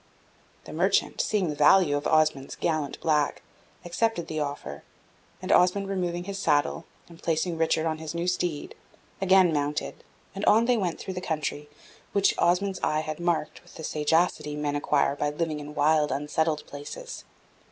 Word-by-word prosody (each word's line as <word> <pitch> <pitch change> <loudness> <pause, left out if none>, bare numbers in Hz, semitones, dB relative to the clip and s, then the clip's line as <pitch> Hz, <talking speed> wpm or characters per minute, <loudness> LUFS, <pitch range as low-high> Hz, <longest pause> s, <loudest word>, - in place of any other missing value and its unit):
The - - -10
merchant, - - +1
seeing 200 -6 0
the 150 - -3
value 150 +1 +5
of 145 - -1
Osmond's 155 -3 +1
gallant 155 -4 -2
black, 150 -2 +1 0.4
accepted 175 +1 0
the 155 - -4
offer; 140 - -4 0.6
and - - -2
Osmond 190 +2 +4
removing 175 -3 -2
his 195 +1 -5
saddle, 150 -1 +1 0.2
and 170 -1 -15
placing 165 +1 0
Richard 160 0 +1
on 160 -1 -1
his 160 +1 -6
new 170 +1 -2
steed, 175 -4 -2 0.5
again 190 -3 +5
mounted, 145 0 -2 0.3
and 195 - -6
on 225 +2 +5
they 250 0 +3
went 185 -7 -1
through 190 - -6
the 180 - -5
country 150 -3 -3 0.4
which 200 -1 +3
Osmond's 190 +2 +2
eye 155 0 +1
had 155 0 -5
marked 170 -3 -1
with - - -19
the 160 - -8
sagacity 155 0 0
men 150 -1 -2
acquire 145 -1 +1
by 145 0 -1
living 155 0 -2
in 150 +1 -9
wild, 150 0 +3
unsettled 150 +2 -1
places. 145 - -8
160 Hz, 165 wpm, -27 LUFS, 150-180 Hz, 0.6 s, value